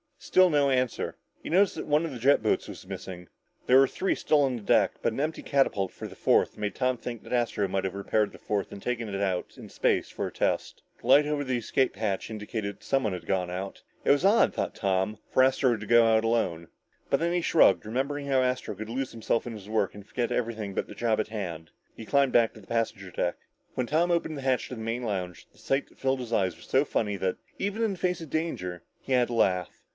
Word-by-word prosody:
Still 185 -1 +4
no 145 -2 +3
answer. 130 -2 0 0.2
He - - -7
noticed 190 +3 +3
that - - -5
one 150 +2 +3
of 165 - -4
the 125 - -7
jet 140 +3 +4
boats 110 - +1
was - - -9
missing. 90 -2 -7 0.4
There 130 - +6
were 135 0 +6
three 190 - -1
still 150 -2 +2
on 130 -2 +1
the 120 - -6
deck, - - +3
but 115 - 0
an - - -5
empty 155 +2 -1
catapult 105 -9 +1
for - - -7
the - - -12
fourth - - +2
made 105 -1 -3
Tom 130 -1 +1
think 120 -1 -7
that - - -7
Astro 120 -4 +1
might 95 0 -1
have 95 - -3
repaired 105 +2 0
the - - -12
fourth 100 -2 -2
and 100 - -9
taken 120 -1 -2
it 100 0 -3
out 95 -3 -2
in - - -10
space - - +1
for - - -3
a - - -7
test. - - -1 0.2
The - - -9
light 145 +3 +7
over 150 -1 -1
the 130 -2 -1
escape 125 +2 0
hatch 105 -2 -2
indicated 105 -1 -4
that - - -23
someone 130 -7 +1
had 90 -2 -6
gone 90 -2 0
out. 95 +2 -5 0.2
It - - +4
was 145 +5 +3
odd, 215 +4 +5
thought - - -3
Tom, 95 +1 0
for 130 - +5
Astro 130 -2 +3
to 105 - -8
go 120 +1 +6
out 110 0 +4
alone. 95 -8 0 0.4
But - - +2
then 170 +1 0
he 175 - +1
shrugged, 165 - +4
remembering 140 +5 -2
how 135 -2 +3
Astro 125 -4 -1
could 110 +3 -7
lose 130 +3 -3
himself 115 0 -1
in 120 - -5
his 105 -2 -10
work 110 -3 0
and 100 -1 -10
forget 120 +1 -2
everything 110 -4 -2
but - - -1
the - - -10
job 115 -2 +1
at 110 - 0
hand. 85 -7 -5 0.2
He 110 - -9
climbed 140 +1 +3
back 115 -2 +4
to 110 - -13
the 95 - -19
passenger 110 -4 -2
deck. 85 +1 -1 0.4
When 125 - -2
Tom 165 +5 +2
opened 165 -3 0
the - - -5
hatch 130 -1 +1
to 125 - -5
the 110 - -7
main 115 +2 -3
lounge, 90 -6 -4
the - - -27
sight 135 +1 -1
that - - -24
filled 135 0 +1
his 120 -2 -5
eyes 95 -5 +1
was 85 - -15
so 135 +3 +2
funny 105 -7 -1
that, 95 -1 -1 0.2
even 205 +3 -1
in 220 -3 +1
the 185 - -9
face 180 -1 0
of 160 - -8
danger, 90 - -3 0.2
he 135 - -3
had 125 -1 +4
to 120 - -5
laugh. 90 -6 0
115 Hz, 250 wpm, -28 LUFS, 100-135 Hz, 0.4 s, light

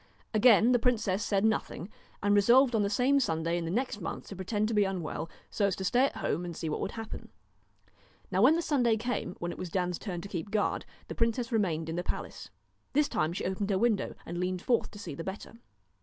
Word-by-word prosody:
Again 225 +1 +6
the 245 - +4
princess 215 -5 +1
said 200 0 +1
nothing, 220 -5 -1 0.4
and 205 0 +3
resolved 240 +6 +5
on 220 - +3
the 200 - +1
same 255 +7 +3
Sunday 165 -7 0
in 175 -1 -2
the - - -3
next 225 +1 -1
month 165 - -5
to 200 - -7
pretend 205 +3 -1
to - - -1
be 210 -1 +4
unwell, 180 -4 -3 0.2
so 200 - +2
as 190 - 0
to 190 - -5
stay 245 +7 +3
at - - -3
home 170 - -1
and 175 -2 -6
see 160 - -3
what 150 - -2
would - - -3
happen. 225 -1 -7 1.0
Now 190 0 +2
when 275 +8 +7
the 335 - 0
Sunday 245 -8 +2
came, 240 -5 -3
when 175 0 -3
it - - -9
was 180 - -4
Dan's 180 0 -1
turn 180 -5 -4
to 200 - -7
keep 195 0 -5
guard, 210 0 0 0.2
the - - -5
princess 230 +1 0
remained 170 -8 0
in 165 +1 -3
the 175 - -1
palace. - - -5 0.4
This 295 +1 +3
time 155 - 0
she 175 - -4
opened 190 +2 -2
her 195 - +2
window 220 -1 +1
and 175 +1 -5
leaned 180 0 -2
forth 240 -2 +1
to - - -12
see 180 -7 -6
the 165 - -6
better. 195 +4 -7
205 Hz, 235 wpm, -30 LUFS, 180-230 Hz, 1.0 s, when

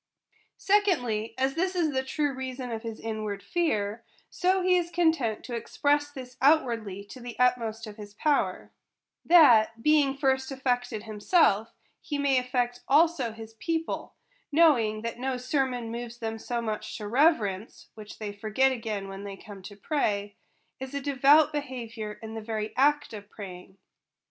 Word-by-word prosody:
Secondly, 250 - +1
as 265 +1 +1
this 365 +4 -1
is 330 -4 +1
the 260 - +1
true 290 +2 -1
reason 260 -1 -5
of 225 -1 -4
his 225 -1 -6
inward 215 -3 -4
fear, 220 -7 -1 0.3
so 370 +1 +1
he 365 0 +4
is 350 -1 0
content 320 -11 +1
to 245 - -7
express 290 +5 0
this 255 -3 -10
outwardly 235 -9 +2
to 205 +6 -12
the 240 -1 -8
utmost 235 -3 +1
of 210 0 -10
his 205 -1 -10
power; 295 +4 0 0.5
that, 230 -9 +6
being 290 -3 +3
first 265 -1 +1
affected 245 -4 -1
himself, 215 - +2 0.3
he 290 - -3
may 280 -2 +3
affect 245 -1 -1
also 295 -4 +3
his 225 0 -10
peo 325 +9 -1
ple; - - -6 0.4
knowing 240 -9 +4
that 230 +1 -4
no 260 0 -1
sermon 250 -2 -1
moves 235 0 -6
them 225 -1 -4
so 235 +1 -3
much 215 -2 -4
to 210 - -6
reverence 230 - +1
(which 215 -1 -11
they 210 -2 -5
forget 215 +6 +1
again 220 -5 -4
when 195 +1 -8
they 200 -1 -7
come 200 -1 -11
to 200 +2 -10
pray), 205 -5 -1 0.4
as 265 +1 -7
a - - 0
devout 285 +3 +4
behaviovu' 230 -7 -5
in 220 0 -7
the 225 - -5
very 215 -1 -4
act 290 0 +2
of 205 -1 -9
praying. 190 -2 -10
245 Hz, 165 wpm, -27 LUFS, 215-285 Hz, 0.5 s, that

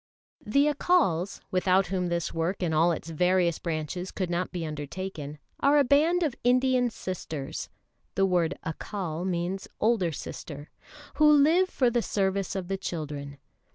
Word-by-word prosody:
] - - -
THE 280 +7 +3
Accals, 285 - +1
without 185 +1 +3
whom 180 -1 0
this 170 -1 -2
work 170 +4 -1
in 165 -2 0
all 165 +3 +4
its 165 0 -4
various 180 0 +2
branches 170 +2 -3
could 185 -3 -3
not 175 +1 -1
be 170 -2 -3
undertaken, 150 0 -6 0.2
are 285 +1 +4
a 290 - +6
band 315 +7 +3
of 300 -6 0
Indian 250 0 +3
sisters 160 -9 -5 0.5
(the 195 - +3
word 175 -3 +1
Accal 170 +1 -4
means 180 +2 -2
older 215 -7 +2
sister) 145 0 -8 0.5
who 300 0 +6
live 320 +6 +5
for 250 -7 +2
the 240 0 +1
service 195 -2 -1
of 190 -2 -3
the 195 +1 -2
children. 145 -6 -5
185 Hz, 155 wpm, -27 LUFS, 165-240 Hz, 0.5 s, a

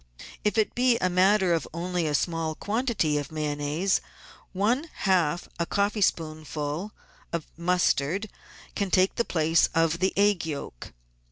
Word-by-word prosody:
If 210 +2 0
it 220 - +2
be 245 -1 +3
a 185 -4 0
matter 185 0 +4
of 165 - -1
only 175 -1 -1
a 150 - 0
small 165 0 -1
quantity 210 - 0
of 145 0 -6
Mayonnaise, 150 +4 0 0.5
one 235 - 0
half 175 -4 +1
a 170 - 0
coffeespoonful 160 -4 -1 0.4
of 170 -2 -3
mustard 175 +1 +1 0.5
can 200 -2 -1
take 185 +1 +3
the 235 - 0
place 160 0 +2
of 165 0 +2
the 190 +1 +2
egg 200 -3 +3
yolk. 145 - -6
175 Hz, 140 wpm, -26 LUFS, 155-200 Hz, 0.5 s, matter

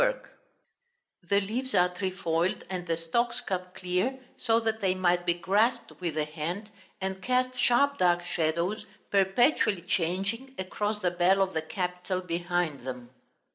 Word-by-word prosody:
Appendix - - 0 1.0
8); - - -28
the 200 0 +4
leaves 250 +7 -2
are 180 0 +5
trefoiled, 180 -2 -1
and 180 -1 -4
the 165 -1 0
stalks 235 +9 0
cut 185 -2 -4
clear 185 +8 -1 0.2
so 230 -1 +2
that 220 -1 -1
they 190 -2 +2
might 175 -1 +1
be 170 - +3
grasped 210 +8 +1
with 170 -4 -2
the 155 -1 +1
hand, 170 +7 -5 0.3
and 190 0 -3
cast 255 +3 +1
sharp 265 +3 +3
dark 175 -1 +3
shadows, 175 +6 -1 0.2
perpetually 200 - +3
changing, 195 +10 -1
across 210 +3 -2
the 180 -2 +1
bell 180 +2 +3
of 190 -1 +1
the 160 - 0
capital 180 +2 -3
behind 175 -3 -1
them. 125 -2 -7
185 Hz, 155 wpm, -28 LUFS, 175-220 Hz, 1.0 s, are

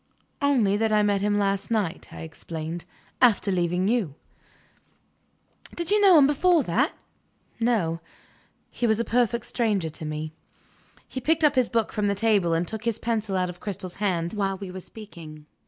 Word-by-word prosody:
"Only 240 -9 +3
that 220 0 +1
I 210 -1 +4
met 205 -1 +1
him 205 0 +1
last 200 -1 0
night," 205 -6 -1
I - - -9
explained, 160 +1 -6 0.4
"after 220 -5 +4
leaving 180 +1 +1
you." 210 - 0 1.6
"Did 340 +1 -3
you 420 0 +4
know 380 -4 +7
him 285 - +7
before 315 +3 +3
that?" 250 - +1 0.6
"No. 195 -9 +1 0.7
He 240 - -1
was 220 0 +2
a 235 - 0
perfect 240 -1 +1
stranger 210 -10 0
to 155 - -10
me." 155 0 -4 0.7
He 260 - -6
picked 320 +4 +1
up 295 -2 +5
his 255 -4 +2
book 230 -2 0
from 210 -1 0
the 200 - +1
table, 200 -5 +2
and 170 +1 0
took 220 +3 -6
his 230 -2 0
pencil 220 -4 -1
out 180 -1 0
of 175 - -16
Cristel's 185 -3 -5
hand, 175 -4 0
while 195 -2 -1
we 190 -1 -7
were 185 - -6
speaking. 170 -7 -11
205 Hz, 175 wpm, -25 LUFS, 175-235 Hz, 1.6 s, know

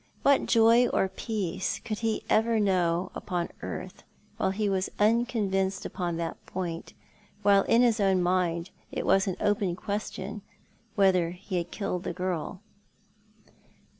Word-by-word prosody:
What 280 -1 +4
joy 230 +1 +5
or 190 - +1
peace 190 -3 -3
could 215 -2 -5
he 225 -1 -1
ever 225 +1 +3
know 180 -3 +1
upon 175 -3 -3
earth - - -6 0.4
while 190 - +1
he 205 +2 -1
was 190 -1 0
unconvinced 205 -4 +1
upon 175 -2 -3
that 165 -1 -4
point, 175 -3 -5 0.5
while 200 -1 +6
in 235 +2 +4
his 235 -2 +3
own 195 -2 +3
mind 175 -1 0 0.2
it - - -3
was 195 0 +3
an 185 - -1
open 200 -4 +1
question 205 0 -4 0.5
whether 185 -4 +4
he 180 +2 -5
had 170 0 -2
killed 180 -4 -3
the 175 - -4
girl 180 0 -3
195 Hz, 140 wpm, -28 LUFS, 180-215 Hz, 0.5 s, while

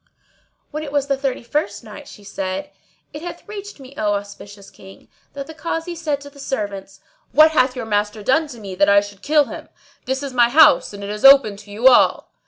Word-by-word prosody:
When 305 0 -5
it 295 -2 -7
was 285 -1 0
the 280 -1 0
Thirty 270 -2 -3
first 235 -5 -3
Night, 215 -2 -11
She 205 - -14
said, 195 -1 -5 0.4
It 300 - -8
hath 350 +5 -9
reached 410 -3 -9
me, 265 0 -13
O 210 -1 +1
auspicious 200 0 -9
King, 190 0 -16 0.2
that 280 -1 -6
the 320 - -11
Kazi 325 +2 -4
said 315 -4 -3
to 285 - -11
the 280 - -17
servants, 200 -7 -5 0.3
"What 310 +1 +6
hath 255 -4 +2
your 250 -3 -5
master 210 0 -2
done 310 +8 +2
to 245 -5 -11
me 200 -3 -8
that 200 +2 +2
I 200 0 +6
should 205 -1 -11
kill 300 +3 +3
him? - - -10 0.4
This 265 +2 -3
is 275 -2 -6
my 240 -1 +4
house 310 +4 +5
and 200 -1 -9
it 200 - -5
is 210 0 -7
open 270 -6 +7
to 205 0 -14
you 225 +5 +2
all." 255 - +4
255 Hz, 220 wpm, -20 LUFS, 205-290 Hz, 0.4 s, open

